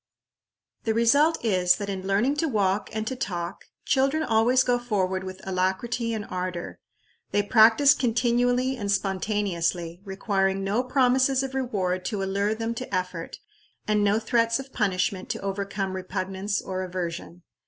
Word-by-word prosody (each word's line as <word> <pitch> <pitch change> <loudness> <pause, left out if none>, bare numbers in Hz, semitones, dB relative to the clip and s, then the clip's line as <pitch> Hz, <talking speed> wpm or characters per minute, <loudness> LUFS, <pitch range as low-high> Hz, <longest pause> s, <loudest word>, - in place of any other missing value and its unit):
The 220 -1 0
result 285 +8 +4
is, 180 -4 +3
that 200 +2 -5
in 190 -1 -4
learning 225 +9 +1
to 325 - +1
walk 205 -5 0
and 220 0 -3
to 260 - -3
talk, 180 -7 -4 0.2
children 275 +4 +2
always 240 +1 +3
go 245 -1 +1
forward 190 -6 -1
with 185 0 -8
alacrity 190 +6 -1
and 210 -2 -4
ardor. 180 -1 -5 0.5
They 205 - +1
practise 225 +7 +6
continually 245 +1 +1
and 205 -3 -2
spontaneously, 185 -4 -1
requiring 195 -1 -1
no 200 +5 +1
promises 260 +1 +2
of 270 0 -5
reward 195 -9 -1
to 200 -1 -2
allure 200 +2 0
them 225 +1 -3
to 250 -1 -7
effort, 180 -3 -3 0.5
and 210 -1 +2
no 205 +1 +3
threats 230 +1 +1
of 270 0 -9
punishment 190 -3 -1
to - - -3
overcome 195 -1 -3
repugnance 190 +2 -3
or 185 0 -4
aversion. 175 -1 -5
205 Hz, 150 wpm, -26 LUFS, 190-240 Hz, 0.5 s, practise